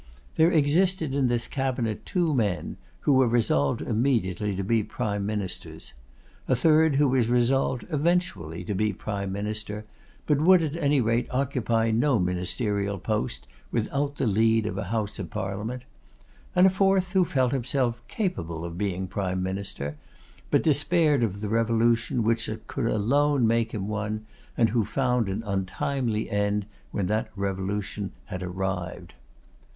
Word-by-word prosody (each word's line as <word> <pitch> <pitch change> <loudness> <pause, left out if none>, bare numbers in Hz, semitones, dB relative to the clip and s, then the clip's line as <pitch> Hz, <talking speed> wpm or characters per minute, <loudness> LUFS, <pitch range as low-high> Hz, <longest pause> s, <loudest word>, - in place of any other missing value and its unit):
There 160 +1 +5
existed 160 0 +2
in 135 -2 +2
this 120 -1 0
cabinet 125 -6 -2
two 175 -4 +1
men, 105 -8 -1 0.2
who 145 - +3
were 130 -1 +5
resolved 110 - +1
immediately 105 -5 0
to 95 - -2
be 115 +3 +2
prime 105 -2 -3
ministers; 105 -4 -4 0.5
a 130 - +3
third 155 +2 +4
who 145 +1 +4
was 125 -3 +2
resolved 125 +1 +2
eventually 150 - 0
to 105 - -3
be 105 +2 0
prime 100 0 -4
minister, 105 +1 -4 0.4
but 150 -1 +2
would 180 +1 +6
at 155 -1 -2
any 145 -4 +2
rate 115 +1 +1
occupy 120 -4 0
no 125 +3 +3
ministerial 100 +3 -1
post 105 - -2 0.3
without 140 +5 -1
the 135 - -1
lead 110 +1 +3
of 105 - -2
a 95 - -3
House 105 +1 -2
of 95 - -5
Parliament; 105 +6 -4 0.7
and 180 +1 +6
a 190 - +6
fourth, 190 -1 +2
who 190 -1 +4
felt 130 -7 +1
himself 125 -2 0
capable 85 - -3
of 85 +1 -6
being 95 -2 -1
prime 95 -1 -2
minister, 95 -6 -4 0.5
but - - +3
despaired 155 -1 +3
of 100 -3 -1
the 105 - -2
revolution 115 +1 +2
which 115 +1 +1 0.2
could - - -3
alone 140 +5 +2
make 115 0 +2
him 100 -3 -3
one; 110 0 -3 0.3
and 115 -1 +4
who 115 +1 +2
found 125 0 0
an 100 +4 -3
untimely 105 +4 -1
end 105 0 0 0.2
when 100 - -2
that 110 +4 -1
revolution 100 +1 -3
had 90 -3 -6
arrived. 90 -2 -4
115 Hz, 150 wpm, -26 LUFS, 100-135 Hz, 0.7 s, would